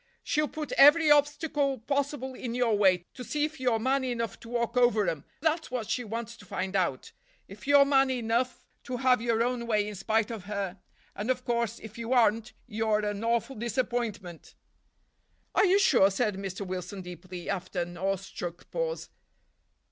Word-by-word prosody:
She'll 305 -1 +1
put 305 0 -6
every 300 +2 +8
obstacle 290 -1 +2
possible 275 +1 -2
in 240 -2 -5
your 245 -3 +2
way, 185 -4 +3
to 255 - -8
see 295 +4 0
if 310 -1 -7
you're 250 -3 +2
man 260 +4 +1
enough 230 -4 -3
to 230 - -12
walk 235 0 -1
over 240 -5 +3
'em; 160 -4 -2 0.2
that's 320 0 0
what 245 -4 -3
she 250 - 0
wants 230 +1 -5
to - - -14
find 190 +2 -3
out; 175 -9 -1 0.4
if 205 +6 -12
you're 285 -1 +7
man 270 -1 +4
enough 245 0 -1 0.2
to 250 - -3
have 250 -2 +3
your 230 -1 +1
own 240 -1 -2
way 210 -2 +1
in 210 - -5
spite 220 +3 0
of 215 -5 -7
her; 200 -2 -4 0.4
and, 210 +4 -4
of 255 -1 0
course, 235 -1 0
if 220 +1 -11
you 230 +2 -2
aren't, 225 -1 +2
you're 215 -2 0
an 205 +1 -3
awful 235 +3 0
disappointment." 230 - -3 1.0
"Are - - +4
you 380 +1 +5
sure?" 260 - +5
said 210 +2 0
Mr. 195 0 -5
Wilson 185 +1 -5
deeply, 180 0 -9
after 185 -1 -2
an 175 0 -5
awestruck 185 -1 -4
pause. - - -3
230 Hz, 180 wpm, -28 LUFS, 200-260 Hz, 1.0 s, every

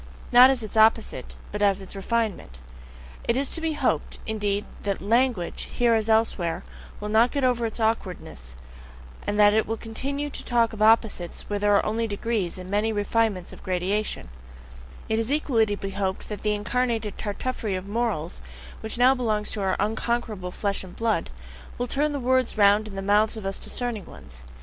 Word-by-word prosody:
Not 250 +1 +9
as 260 -4 0
its 215 - -7
opposite, 220 0 +3 0.2
but 210 - -4
as 200 -1 +3
its 195 +1 -9
refinement! 195 - -2 0.7
It 235 - +1
is 275 0 0
to 330 - -1
be 325 -1 0
hoped, 295 - -1
indeed, 205 -2 -1 0.2
that 200 -1 -2
LANGUAGE, 230 -3 +1
here 240 -1 +3
as 220 0 +1
elsewhere, 220 -7 +1 0.4
will 210 - -4
not 220 +3 +4
get 280 0 -2
over 245 -2 +2
its 220 - -7
awkwardness, 185 - -2 0.7
and 205 +1 0
that 205 0 +7
it 220 0 +2
will 225 +1 -2
continue 280 +6 -3
to - - -1
talk 235 -2 +2
of 215 - -7
opposites 215 -5 +2
where 205 0 -2
there 205 0 +3
are - - +3
only 225 +2 0
degrees 205 -3 -2
and 185 0 -8
many 210 +3 +1
refinements 205 -3 0
of - - -13
gradation; 185 - -1 0.8
it 220 0 +1
is 225 +3 -1
equally 265 -7 +2
to 205 0 -2
be 195 0 -5
hoped 190 -1 -3
that 210 - -5
the 210 -1 +1
incarnated 225 0 -1
Tartuffery 215 0 -3
of 185 0 -4
morals, 205 -7 -1 0.4
which 220 +2 -5
now 250 +2 +6
belongs 220 -5 -1
to 210 - -3
our 190 -1 +1
unconquerable 220 -3 -1
"flesh 200 +2 -2
and 185 -1 -11
blood," 225 - 0 0.5
will 245 - -1
turn 290 +4 0
the 285 - -2
words 255 -2 +1
round 205 +1 +5
in 200 - -9
the 195 - -4
mouths 210 +3 +3
of 215 - -7
us 195 0 -2
discerning 240 -5 -3
ones. 65 -2 -13
215 Hz, 190 wpm, -25 LUFS, 200-235 Hz, 0.8 s, Not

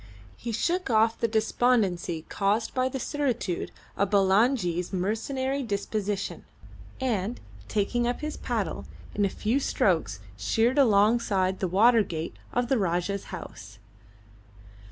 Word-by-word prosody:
He 235 - -5
shook 345 - 0
off 225 0 +3
the 230 - +2
despondency 215 -7 +1
caused 210 +3 0
by 255 0 +1
the 265 - -4
certitude 250 -11 -2 0.3
of 200 - +1
Bulangi's 195 -2 +2
mercenary 260 +8 -1
disposition, 205 -3 -3 0.6
and, 235 -3 -1 0.3
taking 235 +3 0
up 245 - -2
his 305 0 -3
paddle, - - -3 0.3
in 205 - +1
a - - +1
few 225 +7 0
strokes 160 - +1 0.2
sheered 225 - +1
alongside 205 -5 +3
the 190 - 0
water 225 +6 +5
gate 165 -4 -4 0.2
of 245 0 0
the 260 -2 +2
Rajah's 185 +1 -1
house. 105 +2 -9
215 Hz, 125 wpm, -27 LUFS, 190-245 Hz, 0.6 s, water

